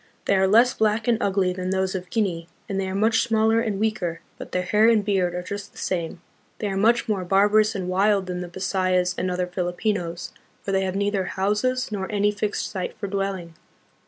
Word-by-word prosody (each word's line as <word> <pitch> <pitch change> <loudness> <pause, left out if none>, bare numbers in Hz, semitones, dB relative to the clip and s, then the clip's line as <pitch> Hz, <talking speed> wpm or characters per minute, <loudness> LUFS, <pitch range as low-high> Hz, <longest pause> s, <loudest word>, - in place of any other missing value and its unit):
They 200 - +3
are 190 0 +3
less 235 +5 +5
black 220 +1 +1
and 235 -2 +3
ugly 190 -2 +1
than 185 0 -4
those 190 0 0
of 180 -1 -5
Guinea, 180 -7 -1 0.2
and 195 -3 -2
they 190 - -1
are 190 - -4
much 220 +3 +3
smaller 225 -1 +2
and 215 -4 -1
weaker, 200 -6 -1 0.2
but - - -8
their 180 - 0
hair 210 +5 +4
and 215 -3 +3
beard 185 -4 +1
are 180 - -3
just 200 +2 -6
the - - -18
same. 170 -2 -3 0.4
They 210 - -2
are 195 - -3
much 230 +4 +3
more 205 -4 -1
barbarous 210 +4 +3
and 185 -2 -3
wild 195 +1 +2
than 180 -1 -4
the 180 - -5
Bisayas 185 0 0
and 185 - -2
other 180 0 -1
Filipinos, 180 0 -3 0.3
for 195 - -3
they 195 0 +2
have 185 0 -3
neither 200 -1 0
houses 210 +8 -1
nor 195 -1 -3
any 205 0 +2
fixed 210 0 -3
sites 185 -3 -4
for 210 - -3
dwelling. 195 -4 -3
195 Hz, 215 wpm, -24 LUFS, 185-215 Hz, 0.4 s, less